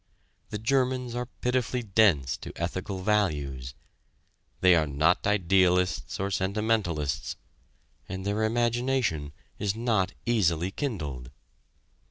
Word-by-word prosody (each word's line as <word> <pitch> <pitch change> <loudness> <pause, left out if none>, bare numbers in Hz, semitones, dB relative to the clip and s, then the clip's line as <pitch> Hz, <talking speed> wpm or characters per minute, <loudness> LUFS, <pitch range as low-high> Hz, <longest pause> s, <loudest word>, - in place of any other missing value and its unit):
The 105 - -3
Germans 125 +1 0
are 125 0 -3
pitifully 125 0 -1
dense 95 - +3
to - - -8
ethical 95 +2 -4
values. 75 - 0 0.9
They 90 -1 +7
are 80 -3 +3
not 80 +8 +2
idealists 90 -3 +2
or 100 +1 -1
sentimentalists, 95 -7 -1 0.7
and 95 +1 -5
their 105 +2 0
imagination 120 - 0 0.3
is 100 -1 0
not 110 -5 0
easily 95 -6 +1
kindled. 75 - -4
95 Hz, 105 wpm, -28 LUFS, 85-115 Hz, 0.9 s, They